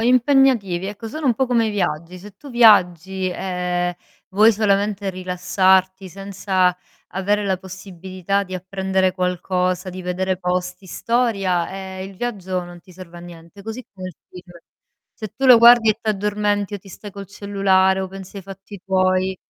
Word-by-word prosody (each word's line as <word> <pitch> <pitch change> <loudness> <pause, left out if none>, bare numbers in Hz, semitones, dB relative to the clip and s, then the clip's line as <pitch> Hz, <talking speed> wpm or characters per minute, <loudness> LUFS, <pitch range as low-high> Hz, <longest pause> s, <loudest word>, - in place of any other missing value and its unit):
impegnativi, 245 -6 +3
ecco, 210 +3 -7
sono 310 +5 -4
un 245 - +3
po' 265 +2 0
come 235 -2 +2
i - - -1
viaggi: 175 -3 -3
se 200 +2 -13
tu 285 - -13
viaggi, 190 -6 +4
ehm, 180 -1 -2 0.4
vuoi 215 +4 +5
solamente 205 -1 0
rilassarti, 185 +1 +1
senza 190 -1 0 0.4
avere 205 +2 0
la 190 -2 0
possibilità 190 +1 -4
di 185 -1 -8
apprendere 190 0 -1
qualcosa, 180 0 -1
di 185 +1 -8
vedere 185 +1 -2
posti, 180 +1 -3
storia, 195 -5 0
ehm, 190 0 -7
il 195 - -13
viaggio 190 -6 -3
non 175 0 -11
ti 180 - -18
serve 175 -1 -12
a - - -11
niente; 170 +3 -13
così 225 +3 -7
come 185 -2 -8
il 180 - -12
film: 180 -1 -13 0.6
se 220 - -7
tu 270 - -3
lo 250 -2 +9
guardi 235 -1 +7
e 215 - -2
t'addormenti, 205 -1 -1
o - - -4
ti 195 +1 -17
stai 205 +3 -10
col 200 0 -9
cellulare, 195 -1 +1
o 190 - -3
pensi 195 +1 -11
ai 195 - -7
fatti 195 +1 -11
tuoi 185 0 +1
190 Hz, 165 wpm, -20 LUFS, 185-205 Hz, 0.6 s, lo